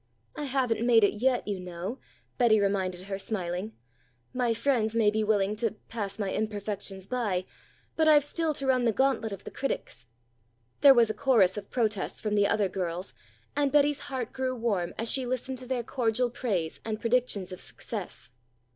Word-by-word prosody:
"I 295 Hz, -, -4 dB
haven't 250 Hz, -4 st, 0 dB
made 235 Hz, -2 st, +5 dB
it 200 Hz, -, +4 dB
yet, 255 Hz, -3 st, +2 dB
you 200 Hz, -2 st, -2 dB
know," 180 Hz, +7 st, -6 dB, 0.4 s
Betty 225 Hz, -3 st, +5 dB
reminded 190 Hz, -3 st, 0 dB
her 195 Hz, 0 st, -4 dB
smiling. 195 Hz, -1 st, -3 dB, 0.6 s
"My 250 Hz, -2 st, +1 dB
friends 230 Hz, -2 st, +1 dB
may 220 Hz, -2 st, +4 dB
be 215 Hz, 0 st, 0 dB
willing 210 Hz, -1 st, +2 dB
to 220 Hz, -1 st, -1 dB
'pass 205 Hz, -3 st, -4 dB
my 200 Hz, -3 st, -2 dB
imperfections 205 Hz, -2 st, -3 dB
by,' 205 Hz, -7 st, -1 dB, 0.5 s
but 315 Hz, -1 st, +3 dB
I've 300 Hz, -2 st, +7 dB
still 315 Hz, +1 st, -1 dB
to 275 Hz, -, -2 dB
run 255 Hz, -2 st, +3 dB
the 230 Hz, -, +4 dB
gauntlet 265 Hz, -3 st, +1 dB
of 200 Hz, 0 st, -7 dB
the -, -, -8 dB
critics." 125 Hz, -, -4 dB, 0.7 s
There 280 Hz, -2 st, +8 dB
was 230 Hz, -2 st, +5 dB
a -, -, -4 dB
chorus 230 Hz, -10 st, +3 dB
of 205 Hz, -1 st, -7 dB
protests 215 Hz, -5 st, -1 dB
from 215 Hz, -1 st, -2 dB
the 205 Hz, -1 st, +4 dB
other 205 Hz, -2 st, +2 dB
girls, 180 Hz, -1 st, -4 dB, 0.4 s
and 285 Hz, -1 st, +2 dB
Betty's 290 Hz, 0 st, +3 dB
heart 255 Hz, -3 st, -4 dB
grew 260 Hz, -1 st, -1 dB
warm 205 Hz, -7 st, -1 dB
as 225 Hz, -, -2 dB
she 260 Hz, -2 st, 0 dB
listened 255 Hz, +1 st, -3 dB
to 255 Hz, -, -10 dB
their 250 Hz, -2 st, -1 dB
cordial 240 Hz, 0 st, 0 dB
praise 190 Hz, -11 st, -2 dB
and 215 Hz, -1 st, -3 dB
predictions 230 Hz, -6 st, 0 dB
of 185 Hz, -, -7 dB
success. 200 Hz, -, -7 dB
220 Hz, 180 wpm, -28 LUFS, 200-255 Hz, 0.7 s, There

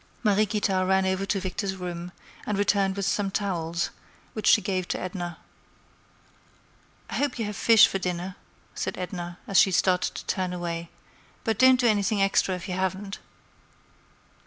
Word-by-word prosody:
Mariequita 210 Hz, -2 st, +2 dB
ran 190 Hz, 0 st, +2 dB
over 190 Hz, +1 st, -1 dB
to 200 Hz, -, 0 dB
Victor's 190 Hz, +1 st, -3 dB
room, 175 Hz, -1 st, -6 dB, 0.4 s
and 210 Hz, -, 0 dB
returned 200 Hz, -1 st, +2 dB
with 200 Hz, -1 st, -2 dB
some 200 Hz, 0 st, 0 dB
towels, 170 Hz, -4 st, -2 dB, 0.4 s
which 215 Hz, -2 st, -3 dB
she -, -, +7 dB
gave 185 Hz, -2 st, -2 dB
to -, -, -2 dB
Edna. 175 Hz, -2 st, -5 dB, 1.7 s
"I -, -, -2 dB
hope 285 Hz, -3 st, 0 dB
you 225 Hz, -, -2 dB
have 210 Hz, 0 st, -5 dB
fish 225 Hz, +1 st, +7 dB
for 195 Hz, -, -2 dB
dinner," 180 Hz, 0 st, -3 dB, 0.4 s
said -, -, -4 dB
Edna, 175 Hz, -1 st, -5 dB
as 195 Hz, -, +4 dB
she -, -, +6 dB
started 180 Hz, 0 st, +1 dB
to -, -, -3 dB
walk 180 Hz, -1 st, -1 dB
away; 170 Hz, -1 st, -4 dB, 0.5 s
"but 220 Hz, -2 st, -1 dB
don't 260 Hz, -1 st, +6 dB
do 250 Hz, -, +2 dB
anything 205 Hz, -1 st, +2 dB
extra 195 Hz, -1 st, +2 dB
if 180 Hz, -, -7 dB
you 185 Hz, -, -3 dB
haven't." 190 Hz, +2 st, -3 dB
190 Hz, 160 wpm, -26 LUFS, 180-205 Hz, 1.7 s, she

